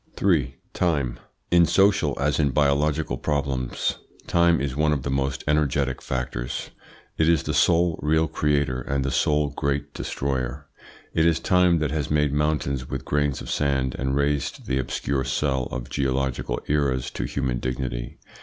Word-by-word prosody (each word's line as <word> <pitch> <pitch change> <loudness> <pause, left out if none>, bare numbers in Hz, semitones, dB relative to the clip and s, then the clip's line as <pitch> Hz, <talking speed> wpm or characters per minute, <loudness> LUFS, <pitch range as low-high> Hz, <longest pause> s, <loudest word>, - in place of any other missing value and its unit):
3. 75 -10 +1 0.2
TIME 75 -9 0 0.3
In 85 -1 +6
social 95 -4 +3
as 70 +1 +1
in 75 -2 +3
biological 75 +2 +1
problems 70 -4 -1 0.3
time 85 -2 +3
is 70 -1 -2
one 75 +1 +2
of 70 -3 -2
the 70 - -2
most 65 0 -1
energetic 70 -3 +1
factors. 60 -1 -4 0.5
It 80 0 +4
is 85 -4 +3
the - - -2
sole 85 -1 +3
real 80 +2 +2
creator 75 -4 0
and 70 +1 -2
the 70 - -1
sole 75 +2 +2
great 70 0 -2
destroyer. 65 +1 -3 0.5
It 80 0 +3
is 80 -1 +2
time 90 -2 +3
that 75 -3 -1
has 75 -2 -2
made 75 -2 +2
mountains 75 -3 0
with - - -4
grains 75 -1 0
of - - -6
sand 65 -3 0
and 65 0 0
raised 70 0 -1
the 65 - 0
obscure 65 +1 -1
cell 65 -1 0
of - - -5
geological 65 -2 -1
eras 70 -4 0
to - - -3
human 65 -3 -2
dignity. 65 -1 -4
70 Hz, 160 wpm, -24 LUFS, 65-75 Hz, 0.5 s, In